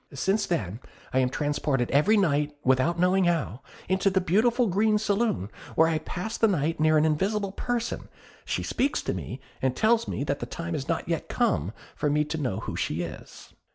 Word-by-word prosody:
Since 195 +9 +1
then, 110 - -2 0.3
I 130 - +3
am 130 -1 +2
transported 145 -3 -1
every 170 - +4
night 150 -5 +1
without 130 +6 +2
knowing 180 +2 +3
how, 155 -8 0 0.3
into 190 +2 +2
the 190 0 +2
beautiful 225 +8 +2
green 210 +2 +2
saloon, 210 - 0 0.2
where 160 - +5
I 160 -1 +1
pass 180 +7 -5
the 225 - +5
night 165 -5 0
near 155 0 +4
an 155 - +4
invisible 195 +6 0
person; 235 +3 -3 0.3
she - - -2
speaks 275 +3 0
to - - -1
me, 130 - -6 0.2
and 130 -1 +1
tells 230 - +3
me - - -2
that 140 0 -2
the - - -5
time 170 0 -5
is 140 -3 -3
not 165 0 -1
yet 165 -2 -2
come 95 - +1 0.2
for 150 - 0
me 150 +1 +2
to 160 +2 -4
know 125 -9 -2
who - - -5
she 85 +3 -1
is." 80 -2 -10
165 Hz, 195 wpm, -27 LUFS, 140-200 Hz, 0.3 s, where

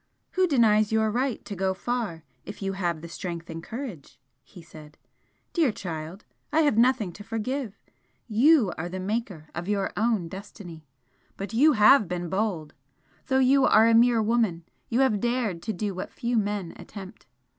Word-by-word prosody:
"Who 370 0 +2
denies 215 - +3
your 220 -1 +2
right 250 +1 -2
to 200 - -6
go 190 0 -1
far 220 -8 -3 0.2
if 205 -1 -9
you 195 0 -1
have 175 -4 -2
the 170 - -8
strength 170 0 -6
and 165 0 -6
courage?" 220 - -8 0.2
he 175 - -14
said 155 -2 -14 0.6
"Dear 320 -8 +3
child, 170 -1 -7 0.3
I 320 - +3
have 290 -7 +3
nothing 235 -4 +3
to 205 +4 -11
forgive! 225 +1 -4 0.5
You 240 - +4
are 175 +2 -3
the 185 +1 -5
maker 190 -6 -4
of 170 +2 -5
your 200 -2 -1
own 220 -5 +1
destiny! 175 -3 -10 0.5
But 195 +2 -6
you 295 +7 +5
have 215 0 +6
been 175 0 -4
bold! 190 -6 -2 0.5
though 265 0 +2
you 265 +1 +4
are 220 -1 +6
a 230 - +4
mere 230 -1 +5
woman 215 -7 0 0.2
you 245 +3 +2
have 225 -6 +2
dared 235 -6 -1
to 220 - -3
do 205 0 -3
what 185 - -6
few 240 +1 -2
men 205 -5 -1
attempt. 195 -8 -11
210 Hz, 175 wpm, -26 LUFS, 175-235 Hz, 0.6 s, have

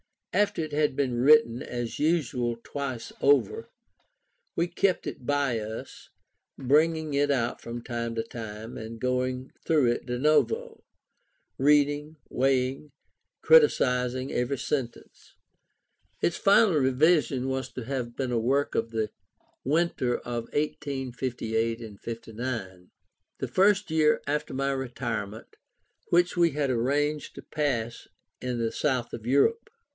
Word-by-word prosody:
After 205 -5 +1
it 155 - -6
had 150 -2 +1
been 135 -3 0
written 130 -3 +5
as 120 -1 -5
usual 140 -7 +1
twice 130 -5 -5
over, 285 - +2 0.9
we 170 - +2
kept 185 +2 0
it 125 - -6
by 140 -5 +1
us, 110 +1 -8 0.5
bringing 155 +3 +2
it 145 +1 +2
out 120 -4 0
from 120 0 -6
time 115 -1 -3
to 115 - -1
time, 110 -1 -8
and 115 +1 -7
going 125 +1 -1
through 145 -7 +3
it 120 - -3
de 125 0 -3
novo, 450 - +1 0.8
reading, 145 +2 +3
weighing, 130 0 +1
and 150 - -18 0.5
criticizing 130 - +4
every 125 +3 -1
sentence. 130 -2 -5 0.9
Its 170 - +1
final 200 -2 +5
revision 135 -1 +3
was 130 0 -2
to 125 - -5
have 120 -1 -4
been 130 -2 -2
a 120 - +1
work 135 +5 +1
of 115 - -1
the 110 -2 -2 0.5
winter 140 -4 +1
of 120 -1 -4
1858 115 -6 -3
9, 100 -7 -5 0.5
the - - -3
first 200 -1 +3 0.3
after 150 +1 -2
my 135 +1 0
retirement, 120 -5 -4 0.5
which 175 +1 +2
we 170 -1 +4
had 145 -2 0
arranged 145 +5 0
to - - -8
pass 120 -6 -2 0.3
in 125 -1 -2
the 115 -1 -1
south 130 -5 -1
of 115 0 -7
Europe. 455 - +2
130 Hz, 130 wpm, -27 LUFS, 120-150 Hz, 0.9 s, written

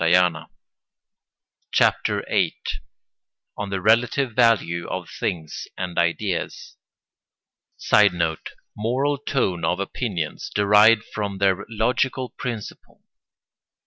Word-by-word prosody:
] - - -56
CHAPTER - - +2
VIII—ON 65 +10 -5
THE 95 -1 -2
RELATIVE 120 +4 +2
VALUE 105 -8 +2
OF 95 -2 -4
THINGS 80 -6 -4
AND 90 -1 -3
IDEAS 85 +2 -2 1.0
[Sidenote: 85 -6 +2 0.3
Moral 135 +6 0
tone 120 -11 -1
of 90 - 0
opinions 95 -5 -3
derived 105 +2 +5
from 100 -2 -3
their 95 0 +1
logical 125 +3 0
principle. 115 -5 -7
105 Hz, 85 wpm, -23 LUFS, 90-115 Hz, 1.0 s, derived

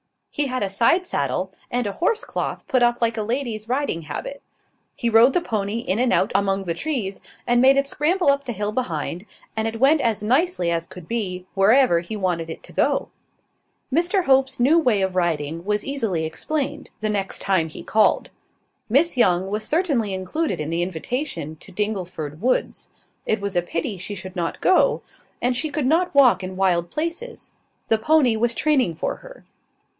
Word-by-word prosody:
He 290 -1 -1
had 255 -3 -2
a 195 - -1
side 240 - +2
saddle, 185 - -2 0.2
and 245 -1 -1
a 200 - -1
horse 425 - 0
cloth - - -4
put 255 - +2
on 240 0 +4
like 230 -1 +1
a - - 0
lady's 230 -1 -3
riding 255 - -1
habit. 155 - -6 0.5
He 235 - -1
rode 230 +4 +6
the 360 - +2
pony 215 -5 -2
in 210 -2 -1
and 250 0 +2
out 200 - +2
among 195 0 +1
the 170 -3 -1
trees, 215 - -3 0.2
and 240 0 +3
made 270 +1 +6
it 275 - +3
scramble 305 +3 +2
up 280 0 -2
the 245 - -3
hill 210 0 -2
behind, 180 - -3 0.3
and 220 0 0
it 225 0 -4
went 285 +4 +4
as 225 -4 0
nicely 255 - +1
as 165 0 -2
could 180 -3 -12
be, 185 -6 -3
wherever 200 -1 +4
he 175 +6 -6
wanted 175 -5 -1
it 160 - -8
to - - -14
go. - - +1 0.8
Mr 355 +5 +2
Hope's 265 -1 +2
new 290 +7 +5
way 240 -10 +2
of 190 -1 -1
riding 165 -2 -1
was 210 0 0
easily 225 - -1
explained, 285 - -3
the 215 - 0
next 200 -2 -2
time 185 -5 +1
he - - -8
called. 215 0 +2 0.6
Miss 280 +6 +2
Young 185 -4 +3
was 215 +1 -2
certainly 285 - +1
included 245 - -2
in 155 +1 -3
the 170 +1 0
invitation 175 - -3
to 190 - -12
Dingleford 180 -6 -4
woods: 255 +3 -1 0.4
it 220 - +1
was 200 -1 -3
a 175 - +3
pity 175 +3 -3
she 200 +3 -5
should 185 0 -8
not 170 -1 -3
go; 375 - +3 0.4
and 245 +1 +2
she 310 +6 0
could 290 -2 -2
not 330 +4 +2
walk 250 -10 +6
in 185 0 -5
wild 175 -3 +1
places: 335 +10 -5 0.4
the 225 - +3
pony 265 -2 +3
was 235 +1 +1
training 270 - +2
for - - -3
her. - - -14
220 Hz, 190 wpm, -22 LUFS, 185-275 Hz, 0.8 s, rode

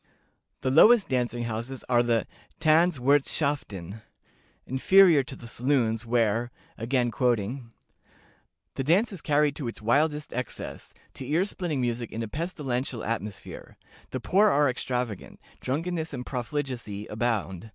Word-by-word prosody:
The 130 - 0
lowest 210 - +6
dancing 120 -2 -1
houses 120 +3 -5
are 120 -1 +4
the 115 -2 +1 0.3
Tanz 160 +1 +4
wirthschaften, 130 - 0 0.6
inferior 170 +4 +5
to 130 - -8
the 120 - -11
saloons, 120 -2 0
where 115 0 +1 0.3
(again 120 +1 0
quoting) 120 0 -1 1.1
"The 135 - 0
dance 195 - +2
is 180 - -8
carried 145 -1 +2
to 140 - -4
its 115 - -6
wildest 150 +7 +1
excess, 125 -1 -6 0.2
to 130 - -8
ear 165 +5 +2
splitting 175 -9 -3
music 120 -1 -2
in 115 - -4
a - - -4
pestilential 135 - -3
atmosphere. 105 -3 -5 0.3
The 130 - -4
poor 195 - +3
are 145 -2 +3
extravagant; 125 -4 -3 0.2
drunkenness 160 +3 -2
and 125 -1 -6
profligacy 125 -5 -4
abound. 110 -3 -2
125 Hz, 130 wpm, -27 LUFS, 115-150 Hz, 1.1 s, lowest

